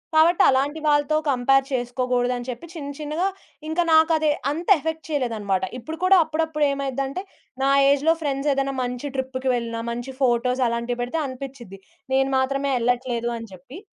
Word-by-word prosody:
కాబట్టి 330 +2 +5
అలాంటి 280 +4 +1
వాళ్ళతో 290 +1 +3
కంపేర్ 270 +1 +3
చేసుకోగూడదని 245 0 -1
చెప్పి, 245 +6 -6
చిన్న 290 -4 -6
చిన్నగా 305 +4 -2 0.4
ఇంకా 320 +3 +1
నాకది 315 -1 +4 0.2
అంత 330 +4 -5
ఎఫెక్ట్ 320 +1 -4
చేయలేదన్నమాట. 220 -9 -1
ఇప్పుడు 315 +6 -7
కూడా 380 +1 +6
అప్పుడప్పుడు 310 -1 -1
ఏమైద్దంటే 275 +3 -3 0.4
నా 270 - +3 0.2
ఏజ్‌లో 285 +3 +3
ఫ్రెండ్సేదన్నా 275 -1 0
మంచి 250 +3 -4
ట్రిప్‌కి 260 0 -2
వెళ్ళినా, 230 -1 -3
మంచి 240 +3 -5
ఫోటోస్ 250 +1 +2
అలాంటివి 235 +1 -2
పెడితే 245 +7 -2
అనిపిచిద్ది. 260 -6 -8 0.3
నేను 270 0 +3
మాత్రమే 275 +1 0
ఎళ్ళట్లేదని 235 -2 -1
జెప్పి. 185 - -11
270 Hz, 140 wpm, -23 LUFS, 245-295 Hz, 0.4 s, కూడా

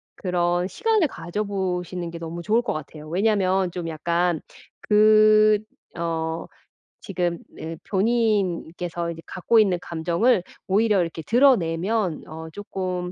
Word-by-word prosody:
그런 175 -1 0
시간을 430 - +1
가져보시는 185 -4 -3
게 170 - -7
너무 165 +1 -6
좋을 220 +6 +2
것 - - -2
같아요. 155 0 -8
왜냐하면 190 0 +1
좀 170 -1 -5
약간 170 +1 0 0.4
그 215 0 +5 0.4
어 165 -1 -2 0.5
지금 175 -5 -2 0.2
네 160 +1 -6
어 - - -7
본인께서 185 -6 0
이제 165 -1 -9
갖고 220 +5 +2
있는 195 -4 +3
감정을 175 +7 +1 0.3
오히려 210 +1 +3
이렇게 165 -2 -2
드러내면 195 - +2
어 160 +1 -8
조금 185 -1 -4
180 Hz, 265 characters per minute, -24 LUFS, 170-210 Hz, 0.5 s, 그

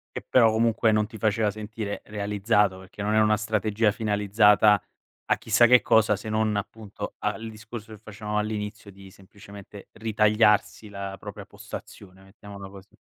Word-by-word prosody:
Che - - -6
però 115 -3 +5
comunque 115 0 +2
non 105 0 +2
ti 110 - -11
faceva 110 0 +1
sentire 110 0 -6
realizzato, 105 -1 0
perché 95 +2 -11
non 105 +1 0
era 110 0 +4
una 105 0 +3
strategia 110 0 0
finalizzata 105 0 +3 0.5
a - - +3
chissà 115 +1 +3
che 125 +1 +6
cosa, 110 -1 +3
se 105 +2 -8
non 110 0 0
appunto 100 0 -6
a 105 - -1
al 115 0 -8
discorso 110 +1 -10
che 105 - -12
facevamo 105 -1 -5
all'inizio, 105 0 -4
di 95 -1 -15
semplicemente 100 +1 -14
ritagliarsi 105 -1 +2
la 100 -1 -7
propria - - -9
postazione, 95 -1 -11
mettiamola 100 0 -12
così. 100 0 -16
105 Hz, 160 wpm, -25 LUFS, 100-110 Hz, 0.5 s, che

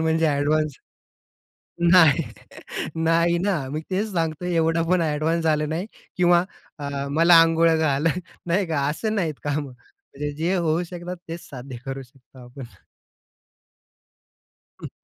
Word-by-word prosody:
म्हणजे 160 0 +2
अ‍ॅडवान्स 150 0 +1 1.2
नाही 165 -7 +6 0.8
नाही 170 +1 +3
ना, 190 0 0
मी 155 - -2
तेच 205 +3 -1
सांगतोय. 165 0 -2
एवढं 165 0 +2
पण 180 -1 +3
अ‍ॅडवान्स 160 +2 0
झालं 155 -1 +1
नाही 165 +5 -3 0.3
किंवा 175 -1 +4 0.3
अ, 140 -1 -4
"मला 165 +3 +6
अंघोळ 165 0 +3
घाल." 155 -1 +1 0.4
नाही 180 +3 +1
का 150 -4 0
असं 215 +8 -2
नाहीत 170 -7 -1
कामं 145 +1 -1
म्हणजे 145 - -9
जे 175 +3 +1
होऊ 170 -1 +1
शकतात 180 0 -6
तेच 165 +1 -7
साध्य 130 -1 -8
करू 135 0 -5
शकतो 130 +1 -20
आपण. 125 +2 -10 2.2
हं. - - -5
160 Hz, 130 wpm, -23 LUFS, 145-175 Hz, 2.2 s, नाही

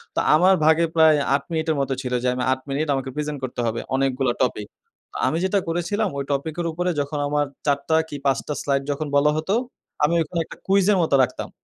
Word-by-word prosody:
তো - - +1 0.2
আমার 185 +4 +5
ভাগে 160 +2 +4
প্রায় 160 -1 +6 0.2
৮ 140 - -2
মিনিটের 160 -1 0
মতো 135 0 -1
ছিল 125 -2 -4
যে - - +1
আমি 125 - -2
৮ 130 - -5
মিনিট 145 +3 -1
আমাকে 135 0 -3
প্রেজেন্ট 150 -1 -3
করতে 125 -1 -3
হবে। 115 +1 -2 0.2
অনেকগুলা 135 -2 +1
টপিক। 105 -5 -1 0.6
আমি 160 - 0
যেটা 190 +2 +2
করেছিলাম 190 +5 -1
ওই 140 - -1
টপিকের 160 +5 -2
উপরে 180 +3 -2
যখন 145 +1 -4
আমার 145 0 +1 0.2
৪ 140 -1 +2
টা 160 - +4
কি - - -6
5 135 -2 +3
টা 150 - -2
স্লাইড 140 -1 0
যখন 150 +2 -3
বলা 150 +1 +4
হতো, 160 +6 -1 0.5
আমি 170 +3 +3
ওখানে 165 +2 -3
একটা - - -12
কুইজের 195 +1 +4
মতো 160 -4 +2
রাখতাম। 125 0 -4
150 Hz, 210 wpm, -23 LUFS, 135-165 Hz, 0.6 s, প্রায়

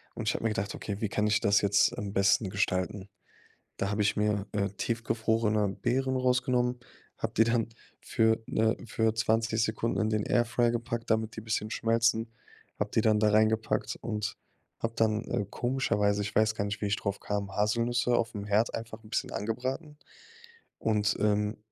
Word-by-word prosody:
und 110 - -5
ich - - +1
hab - - -3
mir 115 - +1
gedacht: 100 -2 -2
„Okay, 100 -1 -5
wie 110 - 0
kann 105 +1 0
ich 105 - +3
das 100 0 +4
jetzt 100 0 +3
am 100 -1 -4
besten 100 +1 +3
gestalten?“ 95 0 -1 0.7
Da 100 - 0
habe 105 0 0
ich 105 - +1
mir, 105 -1 0
äh, 100 -1 0
tiefgefrorene 110 0 0
Beeren 130 +6 -1
rausgenommen, 125 -1 +1 0.4
habe - - -3
die 115 - +6
dann 115 -1 +1 0.3
für, 110 -1 +1
ne 110 +1 +1
für 110 -1 +1
20 115 0 +1
Sekunden 110 +1 -1
in 110 0 +1
den 105 -1 0
Airfryer 120 0 +2
gepackt, 120 0 -3
damit 110 0 0
die - - -4
bisschen 110 -1 -2
schmelzen, 115 0 +1 0.5
habe - - -1
die - - +4
dann 110 -1 +3
da 105 0 +4
reingepackt 110 +1 +1
und 105 -1 -3 0.4
habe 115 0 -2
dann, 110 0 +1
äh, 105 - -1
komischerweise- 105 -5 0
ich 100 - -5
weiß 110 0 +3
gar - - -1
nicht, 100 0 -4
wie - - +1
ich 100 - +1
drauf 100 0 -3
kam- 100 -1 -3
Haselnüsse 120 +3 +2
aufm 115 -3 -2
Herd 105 +3 +2
einfach 115 -1 -6
'n - - -13
bisschen - - -1
angebraten 130 - -3 0.8
und, 105 -2 +1
ähm, 105 +1 +1
110 Hz, 180 wpm, -29 LUFS, 105-115 Hz, 0.8 s, die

